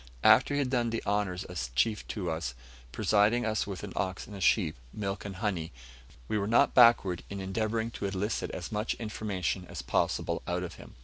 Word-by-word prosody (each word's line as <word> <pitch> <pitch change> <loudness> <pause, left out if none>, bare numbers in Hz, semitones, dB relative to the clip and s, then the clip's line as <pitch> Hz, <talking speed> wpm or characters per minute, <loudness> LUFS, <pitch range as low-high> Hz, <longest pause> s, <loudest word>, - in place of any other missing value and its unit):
After 145 - +6
he - - +1
had 135 -3 0
done 120 -3 +1
the 115 0 -3
honours 100 -3 0
as 80 -9 -5
chief 105 - +1
to 90 -6 -3
us 75 -7 -3 0.4
presented 110 - +3
us 110 -2 0
with 95 -3 -6
an 105 - -6
ox 95 -1 -2
and 105 - -10
a 100 - -7
sheep, 85 -4 +3 0.2
milk 100 -1 -4
and 100 -2 -5
honey 95 -5 -2 0.6
we 105 - 0
were 100 - -1
not 115 +2 +4
backward 115 -8 +5
in 100 - -5
endeavouring 110 +4 -1
to 100 - -3
elicit 100 +3 -2
as 90 - -6
much 105 +1 -1
information 105 -4 -3
as - - -6
possible - - 0
out - - -1
of - - -6
him. - - -14
100 Hz, 200 wpm, -30 LUFS, 95-110 Hz, 0.6 s, After